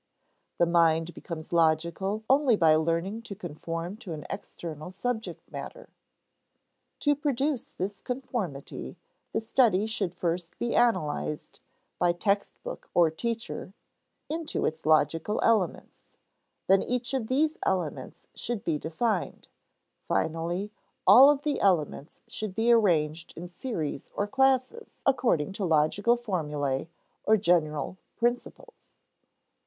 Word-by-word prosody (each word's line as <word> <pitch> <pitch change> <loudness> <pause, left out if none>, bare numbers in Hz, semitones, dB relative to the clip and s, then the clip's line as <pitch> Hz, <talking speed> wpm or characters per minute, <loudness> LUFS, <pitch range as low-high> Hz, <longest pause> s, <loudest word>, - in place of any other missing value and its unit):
The 170 - +4
mind 165 0 +3
becomes 165 0 -7
logical 170 +6 +1
only 270 -3 +4
by 165 -5 +5
learning 170 +7 0
to 215 -3 -8
conform 170 +1 -5
to 210 -8 -7
an 150 -2 -7
external 155 -1 -7
subject 225 +4 -4
matter. - - -8 1.1
To 290 - +4
produce 285 -2 -1
this 195 +2 -5
conformity, 215 - -5 0.3
the - - 0
study 220 -3 +3
should 200 -5 -2
first 170 0 -3
be 240 - -1
analyzed 150 - 0 0.4
(by 175 -1 +3
text 200 +3 -1
book - - -7
or 170 -2 +5
teacher) 225 +2 -4 0.5
into 320 0 -2
its 160 0 -3
logical 160 +6 +2
elements; 215 -7 +1 0.6
then 195 0 +5
each 245 +1 -2
of 255 -5 -1
these 305 +5 +1
elements 160 -8 -2
should 235 -3 -3
be 155 -3 0
defined; 185 +5 -2 0.6
finally, 170 +5 -1 0.3
all 270 +3 +9
of 290 -1 +2
the 300 -1 0
elements 165 -6 0
should 215 -3 -5
be 230 +3 +3
arranged 165 -8 +2
in 175 +2 -6
series 175 - -4
or 205 - 0
classes 265 - +1
according 230 - +2
to 200 - -4
logical 175 +8 +3
formulæ 150 - -2 0.4
or 220 +1 +4
general 175 -3 +1 0.2
principles. 240 - -3
190 Hz, 120 wpm, -28 LUFS, 165-235 Hz, 1.1 s, all